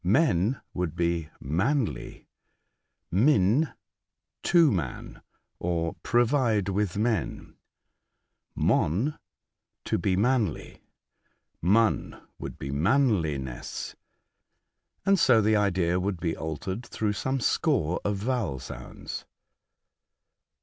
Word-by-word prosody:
Men 110 Hz, -, +2 dB
would 90 Hz, -3 st, -2 dB
be 85 Hz, -2 st, 0 dB
" -, -, -42 dB
manly.'* 95 Hz, -, -1 dB, 0.9 s
Min 115 Hz, -, +3 dB, 0.7 s
''to 165 Hz, -5 st, +5 dB
man," 85 Hz, -, -4 dB, 0.4 s
or 85 Hz, -1 st, -1 dB
'' -, -, -47 dB
provide 120 Hz, -5 st, +3 dB
with 100 Hz, -1 st, -1 dB
men." 110 Hz, -3 st, -1 dB, 1.0 s
Mon 110 Hz, -, +1 dB, 0.7 s
"to -, -, 0 dB
belRanly." 100 Hz, -, 0 dB, 0.8 s
Mun 110 Hz, +6 st, +2 dB, 0.2 s
would -, -, -6 dB
be 70 Hz, -, -5 dB
''manliness." 80 Hz, -, 0 dB, 1.1 s
And 195 Hz, -1 st, +4 dB
so 125 Hz, -7 st, +6 dB
the 110 Hz, 0 st, +3 dB
idea 90 Hz, -4 st, +2 dB
would 95 Hz, -1 st, -2 dB
be 85 Hz, -2 st, -1 dB
altered 80 Hz, -, -4 dB
through 105 Hz, -3 st, -2 dB
some 130 Hz, +5 st, -1 dB
score 90 Hz, -6 st, +1 dB
of 100 Hz, 0 st, 0 dB
vowel 105 Hz, -, -1 dB
sounds. 65 Hz, -, -8 dB
100 Hz, 95 wpm, -27 LUFS, 85-120 Hz, 1.1 s, so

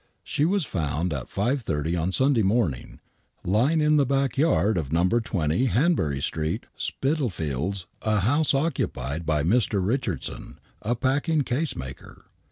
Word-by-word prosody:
She 145 Hz, -, 0 dB
was 190 Hz, -1 st, +1 dB
found 80 Hz, -, -2 dB
at 70 Hz, -4 st, -5 dB
5.30 90 Hz, -, -1 dB
on 90 Hz, +4 st, -1 dB
Sunday 130 Hz, +2 st, +3 dB
morning, 95 Hz, -, 0 dB, 0.4 s
lying 125 Hz, -, +2 dB
in 150 Hz, 0 st, +4 dB
the 145 Hz, -, +5 dB
back 135 Hz, -2 st, +1 dB
yard 135 Hz, -8 st, +2 dB
of 80 Hz, -6 st, -2 dB
IN'o. 90 Hz, +9 st, +2 dB
20 85 Hz, -, 0 dB
Hanbury 125 Hz, -, +1 dB
Street,, 80 Hz, 0 st, -2 dB
Spitalfields, 95 Hz, -, -2 dB, 0.2 s
a 110 Hz, -2 st, +1 dB
house 145 Hz, -, +2 dB
occupied 80 Hz, -, -2 dB
by 75 Hz, -2 st, +1 dB
Mr. 105 Hz, +3 st, +2 dB
Richardson, 110 Hz, -, -3 dB, 0.2 s
a 120 Hz, +3 st, 0 dB
packing 145 Hz, +6 st, +1 dB
case 140 Hz, +5 st, -1 dB
maker. 65 Hz, 0 st, -9 dB
110 Hz, 140 wpm, -25 LUFS, -, 0.4 s, the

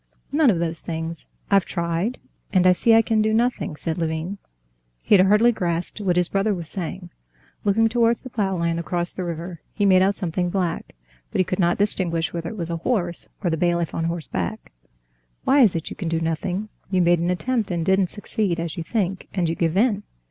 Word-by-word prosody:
"None 295 Hz, -1 st, +4 dB
of 195 Hz, -, +3 dB
those 165 Hz, -1 st, -2 dB
things. 165 Hz, 0 st, -5 dB, 0.2 s
I've 195 Hz, -2 st, +5 dB
tried, 170 Hz, +7 st, -2 dB, 0.3 s
and 185 Hz, -2 st, +3 dB
I 185 Hz, -, +7 dB
see 225 Hz, +5 st, +4 dB
I 225 Hz, -, +6 dB
can 220 Hz, -1 st, +2 dB
do 215 Hz, 0 st, +2 dB
nothing," 235 Hz, -8 st, 0 dB
said 160 Hz, +2 st, -3 dB
Levin. 165 Hz, +4 st, -2 dB, 0.6 s
He -, -, +2 dB
had 190 Hz, -2 st, +7 dB
hardly 210 Hz, +4 st, +5 dB
grasped 175 Hz, -1 st, -2 dB
what 185 Hz, -3 st, +1 dB
his 180 Hz, -1 st, +2 dB
brother 195 Hz, +2 st, +1 dB
was 170 Hz, -3 st, -6 dB
saying. 180 Hz, -1 st, -5 dB, 0.5 s
Looking 215 Hz, +2 st, +3 dB
towards 230 Hz, 0 st, +2 dB
the 255 Hz, -, -9 dB
plough 195 Hz, -4 st, 0 dB
land 170 Hz, 0 st, 0 dB
across 175 Hz, +1 st, -2 dB
the 185 Hz, -, -4 dB
river, 170 Hz, 0 st, -5 dB
he 205 Hz, -, +1 dB
made 185 Hz, -2 st, +6 dB
out 195 Hz, +2 st, +3 dB
something 180 Hz, 0 st, -1 dB
black, 175 Hz, -, -2 dB, 0.3 s
but -, -, -3 dB
he 185 Hz, -, +3 dB
could 185 Hz, +3 st, -3 dB
not 175 Hz, -1 st, +2 dB
distinguish 175 Hz, -5 st, +2 dB
whether 170 Hz, -1 st, -3 dB
it 220 Hz, -, -8 dB
was 170 Hz, -2 st, -3 dB
a 170 Hz, -, -1 dB
horse 175 Hz, -3 st, -2 dB, 0.2 s
or 175 Hz, -, +1 dB
the 160 Hz, -, 0 dB
bailiff 170 Hz, 0 st, 0 dB
on 165 Hz, -, -1 dB
horseback. 160 Hz, -, -4 dB, 0.7 s
"Why 275 Hz, +2 st, +4 dB
is 215 Hz, -9 st, +5 dB
it 165 Hz, -, -4 dB
you -, -, -6 dB
can 175 Hz, -5 st, -4 dB
do 165 Hz, 0 st, 0 dB
nothing? 175 Hz, +5 st, -2 dB, 0.2 s
You 185 Hz, -2 st, +2 dB
made 175 Hz, 0 st, +4 dB
an 170 Hz, +1 st, 0 dB
attempt 225 Hz, +4 st, -1 dB
and 170 Hz, -3 st, -1 dB
didn't 190 Hz, 0 st, +3 dB
succeed, 205 Hz, -4 st, -2 dB
as 165 Hz, 0 st, -4 dB
you 170 Hz, -, -3 dB
think, 190 Hz, -1 st, -2 dB
and 180 Hz, -3 st, +1 dB
you 165 Hz, -, 0 dB
give 165 Hz, +1 st, 0 dB
in. 210 Hz, -2 st, +3 dB
180 Hz, 215 wpm, -23 LUFS, 170-205 Hz, 0.7 s, I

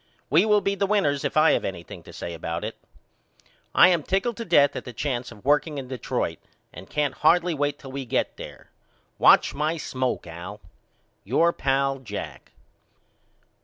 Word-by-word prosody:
We 165 Hz, +8 st, +5 dB
will 210 Hz, -1 st, +4 dB
be 195 Hz, -, 0 dB
the 200 Hz, 0 st, 0 dB
winners 170 Hz, -9 st, +1 dB
if -, -, -2 dB
I 155 Hz, -, +6 dB
have -, -, +1 dB
anything 85 Hz, -3 st, -6 dB
to -, -, -11 dB
say 85 Hz, -, -6 dB
about 85 Hz, +1 st, -4 dB
it. -, -, -5 dB, 1.0 s
I -, -, +8 dB
am 175 Hz, -3 st, +2 dB
tickled 195 Hz, +9 st, -1 dB
to 230 Hz, -, -5 dB
death 145 Hz, -6 st, +4 dB
at -, -, -4 dB
the 125 Hz, -, -9 dB
chance 125 Hz, -1 st, -3 dB
of 105 Hz, -1 st, -15 dB
working 150 Hz, +1 st, +2 dB
in 130 Hz, -2 st, -6 dB
Detroit 130 Hz, -4 st, -3 dB, 0.3 s
and -, -, -11 dB
I -, -, -23 dB
can't 145 Hz, -2 st, 0 dB
hardly 170 Hz, +5 st, +3 dB
wait 145 Hz, -1 st, -1 dB
till 135 Hz, -2 st, -11 dB
we 135 Hz, 0 st, -5 dB
get 115 Hz, -, -1 dB
there. -, -, -11 dB, 0.5 s
Watch -, -, +6 dB
my 155 Hz, +3 st, -1 dB
smoke 130 Hz, -4 st, -2 dB
Al. 85 Hz, +5 st, -8 dB, 0.6 s
Your 165 Hz, -, +2 dB
pal, 135 Hz, 0 st, 0 dB
JACK. 105 Hz, -6 st, -8 dB
140 Hz, 180 wpm, -25 LUFS, 125-165 Hz, 1.0 s, I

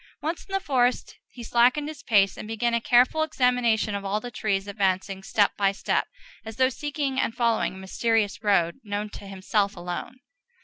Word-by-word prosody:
Once 325 Hz, +3 st, -4 dB
in 390 Hz, -, -17 dB
the 390 Hz, -, +1 dB
forest 255 Hz, -7 st, 0 dB
he 240 Hz, -, -10 dB
slackened 245 Hz, +6 st, +3 dB
his 305 Hz, -2 st, -8 dB
pace, 200 Hz, -7 st, +3 dB
and -, -, -8 dB
began 225 Hz, +2 st, -1 dB
a 235 Hz, -, +1 dB
careful 250 Hz, +7 st, +4 dB
examination 250 Hz, -8 st, +1 dB
of 200 Hz, 0 st, -3 dB
all 200 Hz, +2 st, -1 dB
the 245 Hz, +3 st, -8 dB
trees, 205 Hz, -3 st, -1 dB
advancing, 195 Hz, -1 st, -1 dB
step 205 Hz, +1 st, +2 dB
by 195 Hz, -1 st, +2 dB
step, 195 Hz, -, -1 dB, 0.4 s
as 220 Hz, 0 st, -8 dB
though 260 Hz, 0 st, +3 dB
seeking 280 Hz, -1 st, -3 dB
and 225 Hz, -, -1 dB
following 230 Hz, -5 st, +1 dB
a -, -, -10 dB
mysterious 210 Hz, +2 st, 0 dB
road 195 Hz, -2 st, +2 dB
known 205 Hz, 0 st, -3 dB
to 200 Hz, -, -10 dB
himself 200 Hz, +1 st, -1 dB
alone. 175 Hz, +8 st, -6 dB
225 Hz, 185 wpm, -25 LUFS, 200-250 Hz, 0.4 s, careful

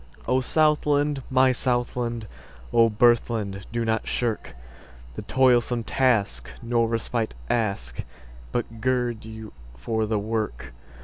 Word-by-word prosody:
O 130 Hz, -, +3 dB
Southland! 150 Hz, 0 st, +2 dB
my 130 Hz, 0 st, +4 dB
Southland!O 115 Hz, -, -1 dB
birthland! 110 Hz, -3 st, +1 dB
do 115 Hz, 0 st, -1 dB
not 110 Hz, -1 st, 0 dB
shirkThe 60 Hz, -, -6 dB
toilsome 125 Hz, -2 st, +3 dB
task, 115 Hz, -5 st, +1 dB
nor 115 Hz, -1 st, +1 dB
respite 115 Hz, -, -2 dB, 0.2 s
ask, 100 Hz, -, -1 dB, 0.5 s
But 115 Hz, -2 st, -3 dB
gird 120 Hz, -3 st, 0 dB
you 110 Hz, -1 st, -9 dB, 0.2 s
for 110 Hz, -, -1 dB
the 110 Hz, 0 st, 0 dB
work. 105 Hz, -, -3 dB
115 Hz, 105 wpm, -25 LUFS, 105-125 Hz, 0.5 s, my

